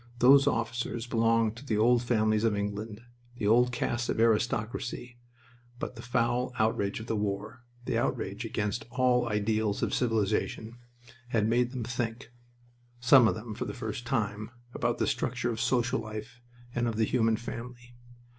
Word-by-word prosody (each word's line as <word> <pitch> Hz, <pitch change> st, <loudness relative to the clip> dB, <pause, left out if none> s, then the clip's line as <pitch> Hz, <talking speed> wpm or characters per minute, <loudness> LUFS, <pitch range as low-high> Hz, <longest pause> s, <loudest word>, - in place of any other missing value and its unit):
Those 135 Hz, +3 st, +6 dB
officers 120 Hz, -1 st, -1 dB
belonged 115 Hz, -2 st, +2 dB
to 125 Hz, -, -10 dB
the 115 Hz, -7 st, -1 dB
old 120 Hz, +2 st, +4 dB
families 110 Hz, -3 st, +1 dB
of 110 Hz, -2 st, +2 dB
England, 105 Hz, +2 st, -4 dB, 0.3 s
the 110 Hz, -, -3 dB
old 120 Hz, +4 st, +4 dB
caste 120 Hz, 0 st, -2 dB
of -, -, -1 dB
aristocracy, 115 Hz, +2 st, 0 dB, 0.6 s
but 125 Hz, -, -5 dB
the 115 Hz, -, -8 dB
foul 125 Hz, +1 st, 0 dB
outrage 110 Hz, -2 st, 0 dB
of 110 Hz, -, -7 dB
the 115 Hz, -, -2 dB
war 105 Hz, +3 st, -3 dB, 0.2 s
the -, -, 0 dB
outrage -, -, -2 dB
against 105 Hz, +6 st, -3 dB
all 125 Hz, -1 st, +2 dB
ideals 105 Hz, 0 st, 0 dB
of -, -, 0 dB
civilization 115 Hz, 0 st, -1 dB, 0.5 s
had 110 Hz, -3 st, +1 dB
made 120 Hz, +2 st, +2 dB
them 130 Hz, -3 st, -4 dB
think, 120 Hz, 0 st, -4 dB, 0.7 s
some 120 Hz, 0 st, +7 dB
of -, -, +1 dB
them 110 Hz, 0 st, -7 dB
for -, -, -4 dB
the -, -, -5 dB
first 110 Hz, +2 st, -5 dB
time, 110 Hz, -3 st, -1 dB, 0.2 s
about 120 Hz, -1 st, -1 dB
the -, -, +1 dB
structure 120 Hz, -1 st, -1 dB
of 115 Hz, 0 st, -3 dB
social 125 Hz, 0 st, +1 dB
life 110 Hz, +3 st, -8 dB, 0.3 s
and 120 Hz, 0 st, 0 dB
of 115 Hz, -, -2 dB
the 110 Hz, 0 st, +2 dB
human 115 Hz, -1 st, +2 dB
family. 120 Hz, +1 st, -8 dB
115 Hz, 165 wpm, -29 LUFS, 110-120 Hz, 0.7 s, some